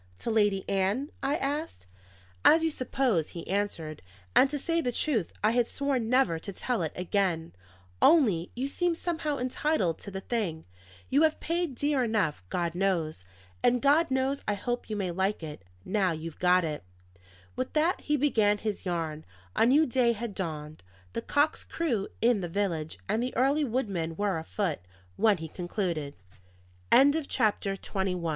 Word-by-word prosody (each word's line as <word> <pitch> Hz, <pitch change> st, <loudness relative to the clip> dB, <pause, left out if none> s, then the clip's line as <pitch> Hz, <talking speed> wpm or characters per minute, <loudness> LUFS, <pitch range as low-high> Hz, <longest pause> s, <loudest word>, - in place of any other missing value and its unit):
"To 230 Hz, -, -3 dB
Lady 205 Hz, -3 st, +2 dB
Ann?" 200 Hz, +9 st, 0 dB
I 280 Hz, +2 st, +1 dB
asked. 290 Hz, -, -3 dB, 0.6 s
"As 325 Hz, +1 st, +6 dB
you 325 Hz, -, +2 dB
suppose," 255 Hz, -, 0 dB
he 165 Hz, -, -7 dB
answered; 185 Hz, -6 st, -2 dB, 0.3 s
"and 270 Hz, -, +6 dB
to 295 Hz, -, -2 dB
say 330 Hz, +4 st, 0 dB
the 250 Hz, -, -1 dB
truth, 235 Hz, -, 0 dB
I 215 Hz, -, +4 dB
had 240 Hz, 0 st, +2 dB
sworn 270 Hz, -5 st, -1 dB
never 240 Hz, -11 st, +3 dB
to 200 Hz, -, -6 dB
tell 235 Hz, +2 st, -2 dB
it 160 Hz, -, -1 dB
again. 180 Hz, -3 st, -1 dB, 0.5 s
Only, 215 Hz, -, +4 dB
you 255 Hz, +3 st, -1 dB
seem 345 Hz, +4 st, 0 dB
somehow 320 Hz, -4 st, -2 dB
entitled 250 Hz, -, 0 dB
to -, -, -8 dB
the 190 Hz, -1 st, -5 dB
thing; 195 Hz, -9 st, -2 dB, 0.5 s
you 280 Hz, +3 st, +4 dB
have 315 Hz, -1 st, +3 dB
paid 335 Hz, -4 st, -1 dB
dear 285 Hz, 0 st, +1 dB
enough, 210 Hz, -, 0 dB
God 170 Hz, -2 st, -1 dB
knows; 170 Hz, -, -1 dB, 0.4 s
and 245 Hz, 0 st, +3 dB
God 290 Hz, +5 st, +4 dB
knows 265 Hz, +1 st, 0 dB
I 205 Hz, -, +1 dB
hope 240 Hz, +4 st, -3 dB
you 215 Hz, -, -2 dB
may 190 Hz, -3 st, -1 dB
like 190 Hz, +1 st, -1 dB
it, 150 Hz, -8 st, -7 dB, 0.2 s
now 190 Hz, -5 st, +1 dB
you've 160 Hz, 0 st, -7 dB
got 180 Hz, -1 st, +4 dB
it!" 150 Hz, -2 st, -4 dB, 0.7 s
With 255 Hz, 0 st, -3 dB
that 320 Hz, +4 st, +2 dB
he 295 Hz, -1 st, +1 dB
began 220 Hz, -7 st, +3 dB
his 205 Hz, -2 st, -4 dB
yarn. 160 Hz, -3 st, -2 dB, 0.3 s
A 225 Hz, -, +4 dB
new 295 Hz, +5 st, +5 dB
day 240 Hz, -2 st, +2 dB
had 230 Hz, -1 st, -5 dB
dawned, 155 Hz, -5 st, -5 dB, 0.3 s
the -, -, -2 dB
cocks 295 Hz, +2 st, +1 dB
crew 240 Hz, -12 st, -1 dB, 0.2 s
in 235 Hz, -4 st, +4 dB
the 175 Hz, -, -4 dB
village 165 Hz, -5 st, -2 dB
and 215 Hz, +3 st, +1 dB
the 250 Hz, -1 st, -3 dB
early 280 Hz, +4 st, +3 dB
woodmen 195 Hz, -10 st, -2 dB
were 200 Hz, -2 st, 0 dB
afoot, 165 Hz, 0 st, -2 dB, 0.4 s
when 210 Hz, -, +3 dB
he 160 Hz, -1 st, -6 dB
concluded. 175 Hz, -4 st, -3 dB, 0.8 s
CHAPTER 270 Hz, -8 st, +3 dB
XXII. -, -, -15 dB
THE 200 Hz, -, -4 dB
REMITTANCE 180 Hz, -2 st, 0 dB
MAN. 165 Hz, -, 0 dB
210 Hz, 175 wpm, -29 LUFS, 175-270 Hz, 0.8 s, As